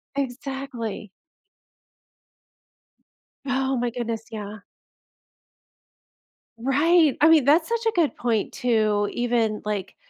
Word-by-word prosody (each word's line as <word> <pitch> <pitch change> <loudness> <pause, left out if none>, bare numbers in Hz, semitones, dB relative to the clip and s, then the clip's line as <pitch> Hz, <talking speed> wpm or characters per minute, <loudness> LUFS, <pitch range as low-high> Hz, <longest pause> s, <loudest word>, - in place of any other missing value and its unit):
Exactly. 260 -6 -5 2.3
Oh 265 0 0
my 240 0 0
goodness, 230 -2 -4
yeah. 210 -1 -6 2.0
Right! 295 +4 +3
I 310 - +7
mean, 310 -5 +5
that's 315 +3 +4
such 465 0 -2
a - - +3
good 330 -4 +1
point 230 -4 -1
too, 215 -4 +1
even, 230 -3 0
like, 205 -2 -4
245 Hz, 95 wpm, -24 LUFS, 220-280 Hz, 2.3 s, I